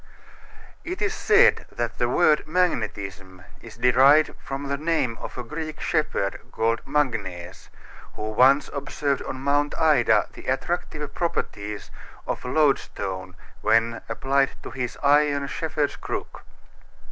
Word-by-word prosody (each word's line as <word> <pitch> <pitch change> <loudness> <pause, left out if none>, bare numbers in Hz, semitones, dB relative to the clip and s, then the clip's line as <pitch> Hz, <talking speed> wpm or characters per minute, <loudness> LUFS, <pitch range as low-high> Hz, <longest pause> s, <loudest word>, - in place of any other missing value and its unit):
It 360 +1 -5
is 415 +1 0
said - - +4
that - - -4
the - - +1
word 150 -1 +3
magnetism 100 - -2 0.2
is 115 -1 -12
derived 135 +5 +5
from 135 +1 -5
the 140 - -1
name 150 -5 0
of - - -7
a 125 - -4
Greek 155 +3 -6
shepherd, - - -1
called 115 +1 0
Magnes, 100 -12 -2 0.5
who 110 0 -4
once 135 +6 +5
observed 140 0 -2
on 130 - -6
Mount 145 +1 +1
Ida 125 -10 +4
the - - -12
attractive 150 +1 -2
properties 105 -11 -3 0.3
of - - -4
loadstone 100 - 0 0.3
when 115 +1 +2
applied 135 +4 +1
to - - -7
his 125 -3 -4
iron 145 0 +3
shepherd's 150 +2 -2
crook. - - -6
135 Hz, 125 wpm, -24 LUFS, 115-150 Hz, 0.5 s, derived